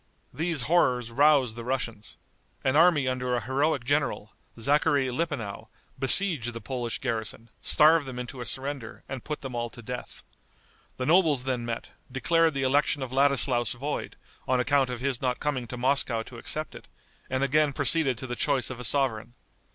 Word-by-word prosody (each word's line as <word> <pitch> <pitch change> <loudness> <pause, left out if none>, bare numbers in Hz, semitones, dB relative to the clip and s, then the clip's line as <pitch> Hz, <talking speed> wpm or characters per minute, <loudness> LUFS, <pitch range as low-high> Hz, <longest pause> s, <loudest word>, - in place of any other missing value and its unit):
These 160 -4 -1
horrors 125 -6 +2
roused 135 -3 +4
the 115 - -7
Russians. 115 -4 -4 0.5
An 130 +1 +1
army 160 -4 +5
under 125 -1 -1
a - - +1
heroic 135 +4 0
general, 140 -5 -1 0.3
Zachary 140 +1 +2
Lippenow, 130 -8 -4 0.3
besieged 135 - +4
the 115 - -6
Polish 120 +1 -3
garrison, 115 0 -4
starved 155 -1 +4
them 130 -2 -7
into 125 +1 -6
a - - -5
surrender, 135 -3 -5
and 135 -3 -6
put 150 -1 -5
them 135 -3 -6
all 120 0 -2
to 120 - -12
death. 125 +2 -7 0.7
The 130 - -2
nobles 155 -5 +3
then 125 -2 -2
met, 115 -1 -5 0.2
declared 165 +4 +2
the 135 - -1
election 140 +1 +2
of 130 - -6
Ladislaus 135 -2 +2
void, 140 +4 -4 0.3
on 130 0 +2
account 135 0 +2
of 125 -1 -5
his 135 -2 -1
not 125 -2 -1
coming 130 -5 -2
to 125 - -7
Moscow 120 -2 +1
to 120 0 -11
accept 155 +6 -3
it, - - -12 0.4
and 130 +1 0
again 150 +2 +3
proceeded 140 -3 +2
to 130 - -6
the 120 -1 -4
choice 130 0 0
of 125 - -7
a - - -6
sovereign. 120 -3 0
130 Hz, 175 wpm, -27 LUFS, 120-145 Hz, 0.7 s, army